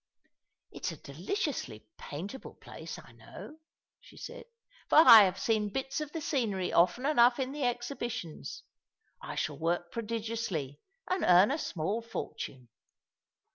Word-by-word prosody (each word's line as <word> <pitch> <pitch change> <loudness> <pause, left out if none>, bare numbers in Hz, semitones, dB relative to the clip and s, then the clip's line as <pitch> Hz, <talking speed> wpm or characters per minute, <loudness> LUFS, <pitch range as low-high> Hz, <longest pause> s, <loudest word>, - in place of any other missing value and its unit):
"It - - -6
is - - -2
a 140 - -12
deliciously 185 - -3
paintable 190 - -8
place, - - -9
I - - -14
know," 310 - -12 0.4
she - - -18
said, 480 0 -9 0.4
"for - - +4
I 230 -10 +10
have 185 0 -1
seen 215 -2 0
hits 270 +5 -3
of 300 -1 -5
the 325 - -5
scenery 220 - -1
often 180 +9 +3
enough 245 -4 +5
in 260 0 -2
the 285 -2 -2
exhibitions. 240 - -4 0.6
I - - -7
shall 150 -1 -3
work 170 +1 -1
prodigiously, 220 - -4 0.3
and 370 0 -1
earn 180 +6 +6
a 300 - -1
small 195 - -2
fortune." 130 - -7
230 Hz, 140 wpm, -30 LUFS, 175-270 Hz, 0.6 s, I